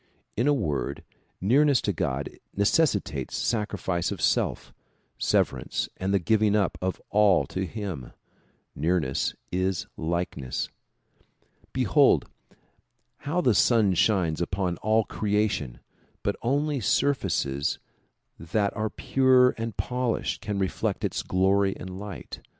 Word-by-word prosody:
In 120 Hz, +5 st, +1 dB
a -, -, +5 dB
word, 75 Hz, -, -1 dB, 0.4 s
nearness 135 Hz, +6 st, +4 dB
to -, -, -1 dB
God 65 Hz, +2 st, -2 dB, 0.3 s
necessitates 100 Hz, -, +1 dB
sacri 105 Hz, -3 st, -1 dB
fice 90 Hz, -1 st, -1 dB
of 100 Hz, -, -4 dB
self, -, -, 0 dB, 0.5 s
severance -, -, 0 dB
and 95 Hz, +1 st, -2 dB
the 100 Hz, -, +4 dB
giving 105 Hz, +3 st, +2 dB
up 100 Hz, -4 st, +1 dB
of 95 Hz, 0 st, -2 dB
all 100 Hz, -3 st, +4 dB
to 95 Hz, 0 st, -3 dB
him. 95 Hz, -, -6 dB, 0.6 s
Nearness 80 Hz, -3 st, 0 dB, 0.2 s
is 95 Hz, 0 st, 0 dB
likeness. 80 Hz, -6 st, -2 dB, 1.0 s
Behold -, -, +4 dB, 1.0 s
how 175 Hz, +5 st, +1 dB
the 125 Hz, -8 st, +3 dB
sun 110 Hz, -4 st, +4 dB
shines 90 Hz, -4 st, +2 dB
upon 90 Hz, 0 st, -1 dB
all 110 Hz, +1 st, +2 dB
creation 100 Hz, -, -1 dB, 0.4 s
but -, -, 0 dB
only 145 Hz, +3 st, 0 dB
surfaces 70 Hz, -, 0 dB, 0.6 s
that 100 Hz, +5 st, -1 dB
are 110 Hz, 0 st, -1 dB
pure 130 Hz, 0 st, +4 dB
and 115 Hz, -1 st, -5 dB
polished 125 Hz, -2 st, -1 dB
can 105 Hz, -2 st, -3 dB
reflect 95 Hz, -1 st, -1 dB
its -, -, -2 dB
glory 95 Hz, +1 st, +2 dB
and 95 Hz, 0 st, -7 dB
light. 100 Hz, -2 st, -8 dB
100 Hz, 120 wpm, -26 LUFS, 90-115 Hz, 1.0 s, a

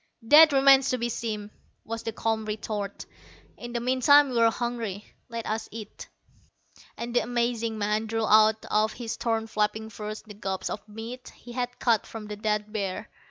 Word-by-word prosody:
"That 305 Hz, +6 st, +8 dB
remains 270 Hz, -1 st, +6 dB
to 255 Hz, -, +1 dB
be 240 Hz, 0 st, -2 dB
seen," 215 Hz, -3 st, -4 dB, 0.3 s
was 230 Hz, 0 st, -4 dB
the 225 Hz, -, -4 dB
calm 220 Hz, 0 st, -1 dB
retort. 210 Hz, -1 st, -4 dB, 0.5 s
"In 240 Hz, 0 st, -8 dB
the 235 Hz, -, -2 dB
meantime, 260 Hz, +4 st, +5 dB
we're 230 Hz, -2 st, +4 dB
hungry. 225 Hz, -4 st, -4 dB, 0.2 s
Let 230 Hz, -1 st, -5 dB
us 220 Hz, +1 st, -3 dB
eat." 215 Hz, -1 st, -9 dB, 0.9 s
And 235 Hz, +1 st, -5 dB
the -, -, +6 dB
amazing 235 Hz, -1 st, -1 dB
man 210 Hz, +1 st, 0 dB
drew 225 Hz, 0 st, -1 dB
out 215 Hz, 0 st, +5 dB
of 215 Hz, +1 st, +2 dB
his 235 Hz, -2 st, -5 dB
torn 225 Hz, -1 st, -1 dB
flapping 220 Hz, 0 st, -1 dB
furs 215 Hz, 0 st, -6 dB
the 215 Hz, -, -11 dB
gobs 195 Hz, -2 st, -4 dB
of 210 Hz, +1 st, -7 dB
meat 230 Hz, +4 st, -8 dB
he 240 Hz, -, -12 dB
had 245 Hz, 0 st, -3 dB
cut 230 Hz, -3 st, +1 dB
from 225 Hz, -2 st, -8 dB
the 210 Hz, 0 st, -6 dB
dead 210 Hz, 0 st, -2 dB
bear. 195 Hz, -4 st, -3 dB
225 Hz, 175 wpm, -27 LUFS, 215-240 Hz, 0.9 s, That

